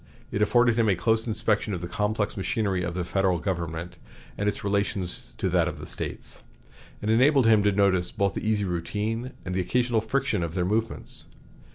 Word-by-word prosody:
It 105 - -1
afforded 120 +2 +4
him 110 -2 +4
a 95 - +4
close 110 +4 +1
inspection 105 -2 0
of 85 - -5
the 90 - -4
complex 105 +3 -1
machinery 95 -1 0
of 85 0 -3
the 90 - -1
Federal 95 -1 +1
government 85 -2 -4 0.4
and 105 0 0
its - - -5
relation 100 -1 0 0.3
to - - 0
that - - +3
of - - -4
the - - -7
States, - - -5 0.6
and 105 - +1
enabled 130 +3 +5
him 110 -2 +6
to 105 0 +3
notice 95 -3 +2
both 100 -1 0
the - - -4
easy 105 -2 +1
routine 105 +8 -2
and 95 - -3
the 95 - +1
occasional 120 +4 +1
friction 135 -1 0
of 85 0 -3
their 90 -1 +1
movements. 110 +3 -2
105 Hz, 195 wpm, -26 LUFS, 95-110 Hz, 0.6 s, him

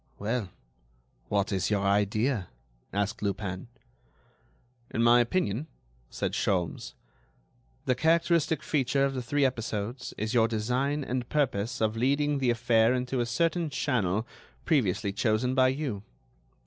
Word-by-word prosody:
"Well, 110 -1 -2 0.8
what 100 0 +1
is 95 -2 0
your 100 -2 +1
idea?" 105 +2 +1 0.4
asked 100 +3 -2
Lupin. 100 -1 -3 1.2
"In 115 - 0
my 120 +1 +6
opinion," 120 - 0 0.4
said - - -2
Sholmes, 90 -4 -1 0.9
"the 125 - +3
characteristic 165 +1 +2
feature 135 -1 +1
of 135 - -1
the 130 - -3
three 140 +4 +1
episodes 115 -1 -3
is 110 +3 -2
your 115 -2 +4
design 125 +6 -1
and 125 -1 -3
purpose 120 -6 0
of 110 0 +1
leading 140 +4 +1
the 130 -2 +1
affair 120 0 +3
into 125 +1 -2
a 120 - 0
certain 165 +6 0
channel 110 -8 0 0.4
previously 105 - +1
chosen 110 +4 +1
by 130 -1 +4
you. 130 -6 -2
120 Hz, 130 wpm, -28 LUFS, 105-135 Hz, 1.2 s, my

